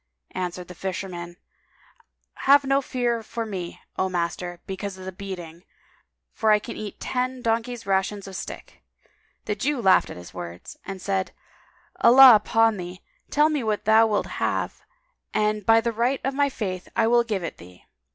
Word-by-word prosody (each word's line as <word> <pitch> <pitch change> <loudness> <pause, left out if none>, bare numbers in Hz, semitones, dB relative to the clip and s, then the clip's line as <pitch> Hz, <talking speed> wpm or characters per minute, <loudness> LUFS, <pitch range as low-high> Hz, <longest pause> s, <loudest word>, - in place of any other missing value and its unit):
Answered 180 -1 -4
the 180 - -9
Fisherman, 175 -2 -5 1.1
"Have 285 0 +8
no 275 +1 +2
fear 240 -3 -1
for 230 +1 -5
me, 185 -5 -6 0.2
O 190 - +1
master, 175 0 -3
because 195 0 -5
of 185 - -10
the 190 - -5
beating; 180 -3 -8 0.7
for 220 - +1
I 210 - +7
can 210 - -7
eat 210 -2 -7
ten 255 0 -2
donkeys' 230 +1 -1
rations 195 +1 -1
of 190 - -9
stick." - - -8 0.6
The 210 - -1
Jew 270 +7 -1
laughed 190 -5 +4
at - - -8
his 90 0 -11
words 85 0 -8
and 195 -1 -5
said, 190 0 -2 0.6
"Allah 260 +1 +9
upon 225 +1 +3
thee, 180 +1 -7 0.3
tell 300 +1 +4
me 300 -3 0
what 215 -2 -1
thou 220 +1 +6
wilt 210 -2 0 0.2
have - - -1 0.5
and 210 0 +1
by 225 0 +7
the 235 +1 -1
right 245 +4 +1
of 270 - -1
my 285 +1 +2
Faith, 185 -8 -5
I 225 - +3
will 235 +1 +4
give 210 -6 -3
it 165 - -5
thee!" 90 +1 -15
210 Hz, 170 wpm, -24 LUFS, 185-235 Hz, 1.1 s, Allah